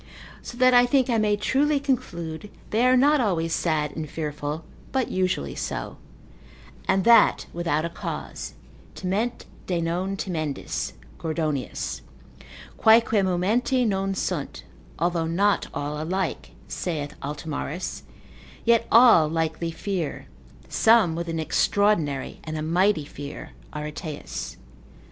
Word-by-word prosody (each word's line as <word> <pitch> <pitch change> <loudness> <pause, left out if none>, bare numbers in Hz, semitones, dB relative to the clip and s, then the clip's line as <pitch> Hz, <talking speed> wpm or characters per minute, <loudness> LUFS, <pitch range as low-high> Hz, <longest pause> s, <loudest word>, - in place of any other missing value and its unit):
So 240 - -9
that 255 0 +5
I 245 0 +6
think 260 -1 +2
I 230 - +3
may 210 -1 +2
truly 285 +7 +2
conclude, 175 - -3 0.2
they 230 +4 +3
are 255 0 +5
not 290 +2 +4
always 165 -7 0
sad 150 -3 0
and 155 -2 -4
fearful, 150 0 -4 0.3
but 265 -2 0
usually 185 - 0
so: - - -4 0.9
and 190 - +2
that 235 +2 +6
without 170 -2 0
a - - -2
cause, - - -6 0.4
timent 210 +6 -2 0.2
de 180 -2 0
non 180 +4 -1
timendis, 155 -8 -3 0.3
(Gordonius,) 155 -4 -2 0.8
quaeque 225 -1 +5
momenti 215 +8 +1
non 195 -2 0
sunt, - - -3 0.3
although 170 -1 0
not 200 +5 +2
all 150 +1 -3
alike 185 +2 -2 0.2
(saith 150 -5 -3
Altomarus), 150 +3 -4 0.6
yet 230 0 +4
all 230 -9 +7
likely 165 +1 -1
fear, 170 -1 -3 0.4
some 220 -7 +4
with 170 +1 -4
an 165 -1 -2
extraordinary 160 -4 +1
and 155 0 -5
a 155 - -3
mighty 170 0 +2
fear, 145 0 -8 0.2
Areteus. 150 +1 -6
175 Hz, 120 wpm, -25 LUFS, 155-220 Hz, 0.9 s, all